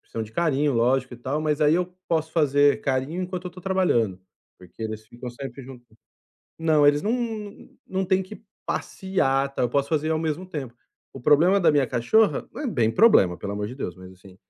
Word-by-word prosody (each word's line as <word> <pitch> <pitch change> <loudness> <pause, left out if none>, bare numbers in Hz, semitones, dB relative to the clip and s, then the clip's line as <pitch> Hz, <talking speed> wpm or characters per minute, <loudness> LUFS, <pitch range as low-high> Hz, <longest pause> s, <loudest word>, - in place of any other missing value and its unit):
precisam 115 - -6
de 110 - -14
carinho, 150 -1 +1
lógico 125 +2 +1
e - - -11
tal, 130 +5 -3
mas 155 -1 -1
aí 150 +1 +4
eu 180 0 +1 0.2
posso 160 -1 -1
fazer 145 -3 +3
carinho 140 +6 -1
enquanto 180 0 -5
eu - - -5
tô 180 +1 -12
trabalhando, 170 - +1 0.4
porque 90 +4 -12
eles 110 0 -5
ficam 120 +1 -8
sempre 135 +1 -8
junto 125 -1 -12 0.7
Não, 155 -3 +3
eles 145 0 +4
não 215 +3 0
não 220 -4 -4 0.2
não 190 0 -2
têm 190 +1 +2
que 215 +4 -12 0.2
passear, 140 -8 -1
tal, - - 0
eu 120 - +1
posso 140 +2 0
fazer 155 0 0
ao 160 - +1
mesmo 160 +2 -2
tempo. 140 -9 -6 0.4
O 135 - -9
problema 160 +9 +4
da 180 - +4
minha 140 -3 +3
cachorra, 200 - +2
não - - -7
é 290 - -2
bem 120 - +1
problema, 115 - +4
pelo 100 0 -5
amor 105 0 -3
de 125 - -7
Deus, 110 -10 -5
mas 95 0 -12
assim, 95 0 -17
145 Hz, 210 wpm, -24 LUFS, 120-180 Hz, 0.7 s, aí